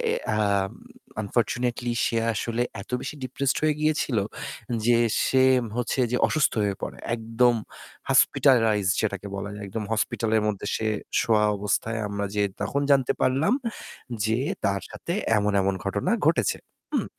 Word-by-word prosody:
এ 465 -2 0 0.2
আ - - +1 0.9
unfortunately 120 +3 -1 0.2
সে 115 - 0 0.2
আসলে 115 +3 -1 0.2
এত 100 - -11
বেশি - - -5
ডিপ্রেসড 135 +2 -1
হয়ে 155 -1 +3
গিয়েছিল 155 -6 +1 0.7
যে 120 - +5 0.3
সে 130 - +3 0.4
হচ্ছে 125 +2 -1
যে - - +2
অসুস্থ 155 -1 +2
হয়ে 100 -1 0
পড়ে। - - -4 0.2
একদম 115 +1 +2 0.6
hospitalized 110 -7 +4
যেটাকে 100 -2 -2
বলা 100 +1 -4
যায়। 105 - -7
একদম 105 +2 -4
হসপিটালের 110 0 +1
মধ্যে 105 -1 -2
সে 110 - -2 0.3
শোয়া 110 -2 +3
অবস্থায় 105 +3 -1
আমরা 100 0 -3
যেয়ে 105 -1 +2
তখন 110 +7 -1
জানতে 135 -2 +4
পারলাম 135 - +2 0.7
যে 110 +2 +1 0.3
তার 100 0 +1
সাথে 170 - -5 0.3
এমন, 105 0 +1
এমন 95 0 +1
ঘটনা - - -1 0.2
ঘটেছে, - - +2 0.3
হুম? - - +1
115 Hz, 145 wpm, -25 LUFS, 105-125 Hz, 0.9 s, যে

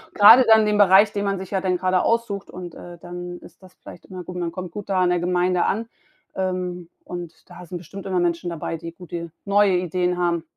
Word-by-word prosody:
grade 225 +5 +9
dann 220 -1 +7
in 215 - +1
dem 210 0 +1
Bereich, 200 +1 +6
den 200 0 -2
man 195 -1 -1
sich 190 +1 -8
ja 190 - 0
dann 185 -1 0
gerade 185 0 +1
aussucht 230 -4 -1
und, 180 -2 -8
äh, 175 0 -11
dann 175 +1 -8
ist 170 - -16
das 185 -1 -17
vielleicht - - -13
immer 185 -1 -8
gut. 180 0 -8
Man 170 -1 -2
kommt 180 -1 -7
gut 205 +2 -8
da 185 -1 +1
an 180 - +3
der 175 - +1
Gemeinde 180 0 +1
an, 225 +3 -1 0.5
ähm, 180 -2 -3
und 175 -2 -9
da 180 - -11
sind 175 - -6
bestimmt 185 +3 -10
immer 185 -1 0
Menschen 175 0 -1
dabei, 165 0 -4
die 165 +1 -8
gute 170 -1 -8
neue 200 -2 +3
Ideen 180 0 -1
haben. 170 -2 0
180 Hz, 235 wpm, -22 LUFS, 175-195 Hz, 0.5 s, grade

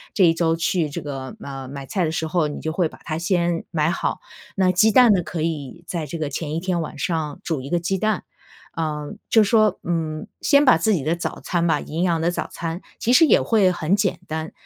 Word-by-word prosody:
这 195 - +4
1 165 - +5
周 165 -1 +1
去 165 -1 0
这 145 - -5
个， 135 -3 -6
呃 135 -1 -7
买 140 +1 -7
菜 185 +6 -1
的 155 - -1
时 160 - -2
候， 160 0 +1
你 150 - -6
就 160 - -3
会 170 0 +1
把 - - -14
它 155 -1 -3
先 170 -1 0
买 155 -1 +1
好， 190 - -2 0.4
那 185 -2 +3
鸡 190 +5 +4
蛋 245 0 +7
呢， 185 - +2
可 165 0 -5
以 160 0 -4
在 165 -4 -3
这 165 - -5
个 155 -3 -2
前 155 +2 -3
1 - - 0
天 180 -1 -1
晚 155 - -6
上 155 -2 -2
煮 155 -6 -2
1 135 - -8
个 175 - +1
鸡 180 +3 -1
蛋。 215 -2 0 0.5
呃 150 -1 -3 0.2
就 225 - +6
说， 215 0 +3
嗯 160 -3 -2
先 285 0 +4
把 255 - +6
自 210 +6 +2
己 165 - 0
的 160 +4 +1
早 170 - -4
餐 170 -1 -1
吧 165 - +2
营 165 +3 -3
养 170 -3 +2
的 165 +2 +1
早 175 - -3
餐 165 +2 -4 0.2
其 240 - +1
实 255 - +7
也 - - +5
会 205 -5 +3
很 175 +1 +1
简 195 -4 0
单， 160 0 -4
165 Hz, 245 characters per minute, -22 LUFS, 155-185 Hz, 0.5 s, 蛋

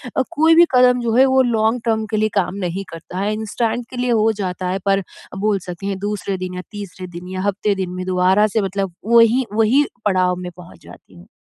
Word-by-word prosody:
अ, - - +3
कोई 320 +2 +4
भी 345 - +7
कदम 250 0 +5
जो 230 -2 -1
है 260 +2 +6
वो 265 0 +4
लॉन्ग 230 -1 +1
टर्म 220 -1 0
के 215 - 0
लिए 215 0 +1
काम 185 0 -2
नहीं 180 +3 -3
करता 165 +2 -7
है, 205 +2 0
इंस्टेंट 225 +2 -2
के 255 - -9
लिए 245 0 0
हो 220 -1 +3
जाता 180 -1 -3
है 190 +1 -2
पर 195 0 +3
अ, 190 - -13
बोल 205 0 0
सकते 175 +2 -7
हैं, 195 -1 -3
दूसरे 200 -1 -3
दिन 185 0 -5
या 180 - -4
तीसरे 195 -3 -8
दिन 180 - -9
या 185 - -2
हफ़्ते 205 +1 -1
दिन 190 -2 -3
में 185 0 -5
दोबारा 185 +3 +3
से 215 +1 0
मतलब 195 -1 -3
वही, 235 +2 +4
वही 225 +6 +3 0.2
पड़ाव 185 -2 +2
में 180 -1 -6
पहुँच 180 0 -13
जाती 90 +2 -15
हूँ। 85 - -16
205 Hz, 235 wpm, -19 LUFS, 185-230 Hz, 0.2 s, भी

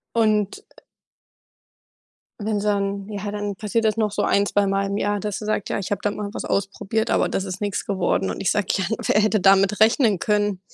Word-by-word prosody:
Und 215 -3 +1 1.8
wenn's 210 -1 -1
dann 200 -1 -1
ja, 205 -1 -5
dann 205 -1 -4
passiert 215 +3 -1
das 215 0 +2
noch 215 -2 0
so - - -1
ein 200 0 +2
zweimal 195 -1 +1
im 200 0 -2
Jahr, 205 0 0
dass 205 0 -4
er 210 - -6
sagt: 215 -2 -1
„Ja, - - 0
ich 190 - -6
habe 205 - -1
da 205 - +1
mal 210 -1 -4
was - - -5
ausprobiert, 200 +2 -1
aber - - +2
das 195 - -2
ist 190 -1 -6
nix 205 -2 -2
geworden“ 175 - 0
und - - -5
ich 185 - +2
sage: 205 -3 0
„Ja, 190 - -1
n 220 - 0
wer 210 - +3
hätte 215 0 +2
damit 195 +2 +4
rechnen 220 - +4
können?“ 205 -2 0
205 Hz, 210 wpm, -22 LUFS, 195-210 Hz, 1.8 s, damit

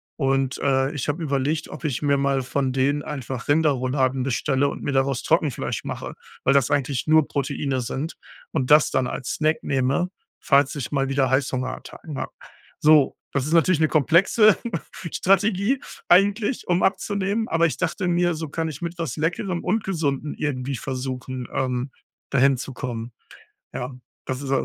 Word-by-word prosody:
und 135 -2 0
äh, 135 0 +2
ich 145 - -3
hab 145 - 0
überlegt, 145 0 -1
ob - - -9
ich 140 -5 -1
mir 140 -1 +3
mal 135 -1 +1
von 130 +1 -1
denen 140 +3 +1
einfach 130 -4 -5
Rinderrouladen 135 -3 +2
bestelle 135 +2 +1
und - - -5
mir - - -1
daraus 135 -1 +1
Trockenfleisch 155 -5 0
mache, - - -5 0.3
weil 135 - +4
das 140 -3 +3
eigentlich 140 -1 0
nur 155 -1 +5
Proteine 140 -1 -2
sind 135 +6 -4 0.4
und 135 -5 -1
das 150 0 +6
dann 130 -1 +1
als 130 - -4
Snack 155 +1 +2
nehme, 135 +6 +1 0.3
falls 140 0 +3
ich 135 -5 -4
mal 135 -2 0
wieder 135 -1 +2
Heißhungerattacken 130 +3 -2
hab. - - -4 0.5
So, 150 -2 +5 0.2
das 140 -2 0
ist 155 - -2
natürlich 170 0 +4
eine 155 - +4
komplexe 185 - +5 0.5
Strategie 200 +6 +2 0.3
eigentlich, 205 +6 +3
um 175 0 +2
abzunehmen, 200 +2 0
aber 165 +1 +3
ich 160 - -4
dachte 185 +1 -1
mir, 175 0 +2
so 160 -2 -5
kann 160 +2 -2
ich 150 0 -8
mit 170 0 -4
was 165 -8 -3
Leckerem 170 +3 -1
und 210 +4 0
Gesunden 150 -6 -1
irgendwie 135 -2 -3
versuchen, 130 0 -5
ähm, 130 0 -1 0.4
dahin 135 0 +4
zu 135 +2 -6
kommen. 120 -2 -5 0.6
Ja, 125 +1 -5 0.3
das 130 +1 -3
ist 135 - -4
140 Hz, 165 wpm, -23 LUFS, 130-165 Hz, 0.6 s, das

